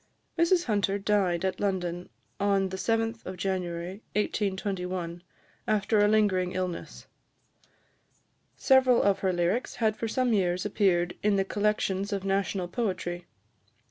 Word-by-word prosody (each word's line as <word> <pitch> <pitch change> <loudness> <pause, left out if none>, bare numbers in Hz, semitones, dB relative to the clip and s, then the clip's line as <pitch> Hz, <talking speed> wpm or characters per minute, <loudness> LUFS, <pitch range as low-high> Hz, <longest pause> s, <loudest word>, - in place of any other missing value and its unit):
Mrs 340 +1 +3
Hunter 200 -3 0
died 195 -4 +1
at 190 - -2
London, 180 -3 -2 0.3
on 195 -1 +2
the 190 - -5
7th 225 -1 -1
January 180 +1 -3
1821, 190 -4 -2 0.5
after 215 0 +2
a 205 - +5
lingering 200 -4 +2
illness. 185 -2 -4 1.5
Several 260 -3 +4
of 195 -1 +2
her 190 - +1
lyrics 175 +7 -1
had 220 -2 +1
for 225 +1 -3
some 250 +1 +1
years 180 -2 +1
appeared 180 -4 +1
in 210 -1 +2
the 195 -1 +1
collections 200 -1 0
of 200 -2 -2
national 195 -1 0
poetry. 180 -4 -3
195 Hz, 125 wpm, -28 LUFS, 180-210 Hz, 1.5 s, a